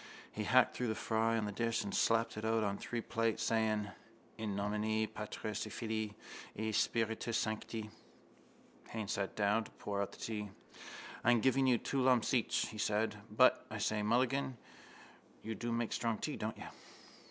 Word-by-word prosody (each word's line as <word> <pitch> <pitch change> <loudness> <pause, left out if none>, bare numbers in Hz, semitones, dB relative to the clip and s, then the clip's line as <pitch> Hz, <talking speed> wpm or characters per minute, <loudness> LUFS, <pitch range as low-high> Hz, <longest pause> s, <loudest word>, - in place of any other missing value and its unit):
He 105 - -3
hacked 130 +4 +5
through 125 - -1
the 110 - 0
fry 115 +1 +1
on 110 - 0
the 105 - -2
dish 115 +1 0
and 100 - -5
slapped 115 0 +2
it 105 - -5
out 110 0 +2
on 100 -1 0
three 120 -1 -3
plates, 115 -1 0
saying: 110 -2 +1 0.5
—In 110 -3 -3
nomine 105 +2 0
Patris 105 0 -4
et - - -9
Filii 110 -2 -2 0.4
et 110 +1 -1
Spiritus 115 +1 +1
Sancti. 110 0 -2 1.0
Haines 110 -3 -3
sat 100 -1 -2
down 105 +2 +2
to - - -11
pour 100 -1 -3
out 100 - -2
the - - -13
tea. 105 -2 -4 0.7
—I'm 120 0 +5
giving 130 +3 +3
you 125 -2 +5
two 135 +3 -1
lumps 125 -2 +3
each, 120 -3 +2
he 110 - -8
said. 105 +1 +1
But, - - +5
I - - -4
say, 110 -1 0
Mulligan, 125 +4 +1 0.9
you 110 - -3
do 120 +2 -3
make 115 -1 0
strong 115 -2 0
tea, - - -3
don't - - -4
you? - - -8
110 Hz, 175 wpm, -35 LUFS, 105-115 Hz, 1.0 s, hacked